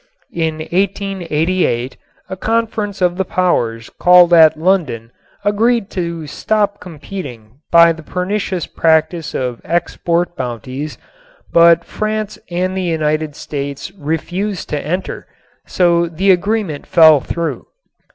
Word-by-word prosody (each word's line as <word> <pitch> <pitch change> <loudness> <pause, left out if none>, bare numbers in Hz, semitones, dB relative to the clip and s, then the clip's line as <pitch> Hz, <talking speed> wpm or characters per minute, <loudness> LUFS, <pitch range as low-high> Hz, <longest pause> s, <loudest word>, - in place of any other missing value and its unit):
In 160 -2 -1
1888 175 -6 -1 0.3
a 190 - -5
conference 215 -1 -1
of 175 0 +1
the 190 - +1
powers 120 -12 -1
called 180 -1 +6
at 160 -2 +7
London 155 -10 0 0.3
agreed 220 +1 +1
to 170 -3 -4
stop 205 +6 -1
competing 140 - -9
by 170 0 +7
the 165 - -11
pernicious 185 +2 -2
practice 160 0 0
of 125 -2 -3
export 175 0 -1
bounties, 130 +4 -5 0.6
but 170 0 +6
France 215 0 -3
and 185 +2 -1
the 190 - -1
United 155 -3 -1
States 140 +3 -5
refused 180 +3 -3
to 150 -1 -2
enter, 180 +5 -4 0.4
so 170 -1 +2
the 185 +4 +2
agreement 190 -4 -1
fell 160 -3 +7
through. 165 +5 -4
170 Hz, 115 wpm, -17 LUFS, 155-190 Hz, 0.6 s, at